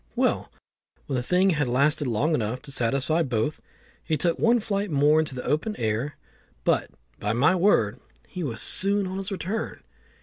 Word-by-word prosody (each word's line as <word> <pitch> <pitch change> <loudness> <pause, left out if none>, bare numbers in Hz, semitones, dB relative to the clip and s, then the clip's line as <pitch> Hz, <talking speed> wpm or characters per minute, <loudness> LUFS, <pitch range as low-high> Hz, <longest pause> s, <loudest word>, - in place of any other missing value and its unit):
Well, - - 0 0.5
when 135 - -3
the 125 - 0
thing 180 +8 +3
had 150 -5 0
lasted 140 +3 +2
long 125 +8 +1
enough 120 -2 -1
to 140 - -9
satisfy 140 +6 +1
both, 125 0 -1 0.4
he 155 - 0
took 170 +3 0
one 235 +1 +4
flight 205 -1 -2
more 150 +1 +4
into 155 -4 -1
the 125 - -5
open 185 +9 0
air; 115 +6 -2 0.5
but - - +1 0.3
by 105 +2 -1
my 145 +11 +4
word 175 - +3 0.3
he 180 - -6
was 120 -9 -4
soon 200 +1 +1
on 185 +1 -4
his 195 +1 -4
return. 195 +4 -4
150 Hz, 175 wpm, -26 LUFS, 125-185 Hz, 0.5 s, one